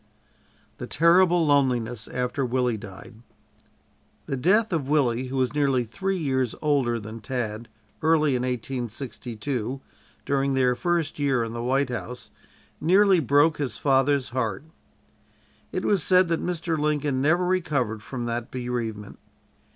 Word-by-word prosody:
THE - - -5
TERRIBLE 175 +1 +4
LONELINESS 125 -6 +1
AFTER 125 +2 -2
WILLIE 125 -1 0
DIED 110 +2 -11 1.0
The - - -3
death 195 - +2
of 145 -5 -1
Willie, 130 -5 +2
who 135 +1 -4
was 130 0 +1
nearly 140 -4 +2
three 190 - -3
years 130 -7 -1
older 135 -6 +1
than 110 +1 -8
Tad, 115 -1 -4 0.3
early 155 -3 +3
in 125 - -1
1862, 125 0 -4 0.5
during 135 -1 +1
their 130 -1 +3
first 170 +2 -1
year 135 -4 +1
in 115 0 -5
the 120 - -4
White 135 +3 +1
House, 125 0 -6 0.5
nearly 190 +3 +4
broke 145 +2 +3
his 140 -3 -2
father's 135 -1 +2
heart. 120 -3 -2 1.1
It - - -3
was 200 -4 +2
said 185 +1 +4
that 165 - 0
Mr. 170 -2 -2
Lincoln 145 -3 0
never 170 +6 +2
recovered 145 - 0
from 120 +2 -5
that 120 0 -3
bereavement. 120 -5 -4
130 Hz, 135 wpm, -25 LUFS, 120-150 Hz, 1.1 s, TERRIBLE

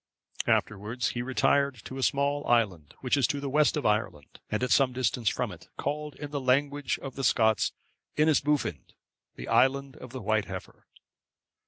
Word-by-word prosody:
Afterwards 105 +4 0
he 120 - -3
retired 135 +2 +2
to 130 - -7
a - - -3
small 140 +2 +1
island, 100 -11 +1
which 130 0 +2
is 140 -3 +3
to 145 -2 -2
the 140 -1 -4
west 150 +2 +3
of 145 - -3
Ireland, 105 -9 -1
and 105 +3 -1
at 125 - -1
some 135 -2 +4
distance 125 -2 0
from - - -2
it, - - -13
called 150 -1 -3
in 145 -1 -7
the 145 -2 -2
language 140 +1 +1
of 135 -2 -6
the 135 - -5
Scots, 110 -4 +3 0.5
Inisboufinde,(558) 150 - +1 0.4
the - - -8
Island 135 +1 +2
of 130 - -10
the 130 - -6
White 110 0 +1
Heifer. 95 0 -9
130 Hz, 175 wpm, -28 LUFS, 115-140 Hz, 0.5 s, some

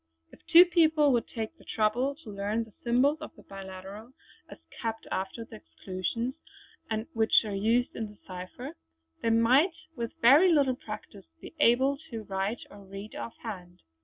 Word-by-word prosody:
If - - -16
two 345 +2 +9
people 320 -4 +4
would 235 -2 +1
take 225 -2 -5
the - - -16
trouble 240 +6 0
to 215 - -8
learn 205 +3 -1
the 220 -2 -16
symbols 255 +6 +3
of 310 - -8
the - - -16
biliteral, 195 +4 -9 0.4
as - - -10 0.2
kept 225 -1 -3
after 195 +5 -3
the - - -11
exclusions 185 - -4 0.6
and 220 0 -2
which 225 0 +4
are 210 - -4
used 225 +5 +1
in 225 - -3
this 210 -1 -17
cipher, 185 0 -8 0.5
they 230 - +1
might 255 +10 +4 0.2
with 235 -3 -4
very 295 +10 +7
little 280 -5 +3
practice - - -9
be - - -11
able 265 +2 +4
to 225 -3 -5
write 195 +3 -2
or 205 - -12
read 195 +2 -9
off 230 - -7
hand. 180 -6 -8
225 Hz, 170 wpm, -29 LUFS, 200-255 Hz, 0.6 s, two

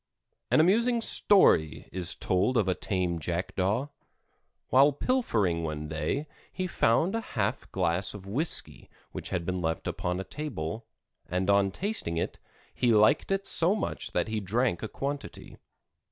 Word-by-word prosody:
An - - +4
amusing 230 +8 +3
story 190 - +4
is 90 -1 0
told 95 +7 +1
of 105 - +2
a 95 - +2
tame 90 -3 -2
Jackdaw. 95 - -1 0.8
While 140 +3 +5
pilfering 115 - 0
one 75 -1 -4
day 80 - -2 0.3
he 185 - -3
found 170 +1 +2
a 230 - -1
half 110 - -3
glass 90 +1 0
of 100 -2 -10
whisky 135 +12 -2 0.2
which - - -6
had 90 -3 -2
been 90 0 -2
left 80 -1 -2
upon 90 -1 -2
a - - -3
table, 110 - -5 0.4
and 90 +3 +1
on 100 -1 +3
tasting 180 - -3
it, - - -3 0.3
he 120 -2 +2
liked 110 +6 +4
it 195 0 0
so 175 +1 +3
much 215 - -4
that - - 0
he 110 0 -2
drank 105 0 0
a 110 - -3
quantity. 140 +5 -6
105 Hz, 155 wpm, -28 LUFS, 90-145 Hz, 0.8 s, While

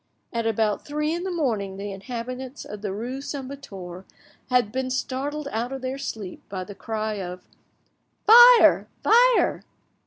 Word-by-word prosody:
At 230 -1 -1
about 220 -2 0
three 300 +1 -2
in 345 - -3
the - - -2
morning 225 - -2
the 200 +1 -5
inhabitants 250 +6 -6
of 210 -1 -8
the 205 -2 -3
rue 245 +7 -5
St. 275 -1 -5
Victor 190 -10 -9 0.5
had 250 -4 +2
been 260 +1 -2
startled 275 +3 -3
out 235 +3 -2
of 270 -1 -6
their 260 +1 -3
sleep 215 -9 -6
by 190 -2 -4
the 205 - -9
cry 215 0 -3
of 180 0 -7 0.8
"Fire, 480 +2 +8 0.2
fire!" - - +4
250 Hz, 155 wpm, -24 LUFS, 205-280 Hz, 0.8 s, Fire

